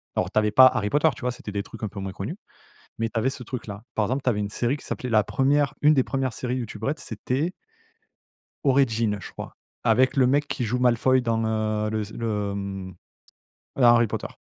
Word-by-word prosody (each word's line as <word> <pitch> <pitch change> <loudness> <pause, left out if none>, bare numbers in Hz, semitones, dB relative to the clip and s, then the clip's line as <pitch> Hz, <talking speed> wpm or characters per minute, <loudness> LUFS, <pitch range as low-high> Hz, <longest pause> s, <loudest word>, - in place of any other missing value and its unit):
Alors, - - 0
tu - - +3
avais 105 0 +1
pas 130 +4 +9
Harry 105 -5 0
Potter, 150 +5 +3
tu - - -12
vois? 125 0 0
C'était 115 -3 -8
des 100 0 -2
trucs 115 - -11
un 110 - -1
peu 100 0 -8
moins 95 -1 -5
connus, - - -5 0.6
mais 115 0 0
tu 115 - -3
avais 125 +4 +1
ce 135 - -7
truc 125 +1 -6
là. 105 +1 -8
Par 110 - +1
exemple, 130 +4 -1
tu - - 0
avais 105 -3 -1
une 100 0 -3
série 120 +5 0
qui - - -14
s'appelait 125 - -4
la 110 -2 +4
1re 140 +5 +2
une 150 +1 +6
des 130 -3 +3
1res 135 -2 -1
séries 125 +1 -3
YouTube 110 -3 -6
Red, 150 +5 -1
c'était 130 - -2 1.1
«Origin», 115 -6 +2
je - - -9
crois, - - -9 0.3
avec 130 +1 +3
le 130 -2 +5
mec 145 +3 +2
qui 125 - -2
joue 120 +3 -1
Malefoy 125 +1 +3
dans, 115 -2 0
heu, 110 -1 0
le 110 0 -1
s 105 0 -6
le, 105 -3 -2
hem, 95 -2 -5 0.8
dans 135 - 0
Harry 120 0 +6
Potter. - - -4
115 Hz, 235 wpm, -25 LUFS, 105-130 Hz, 1.1 s, pas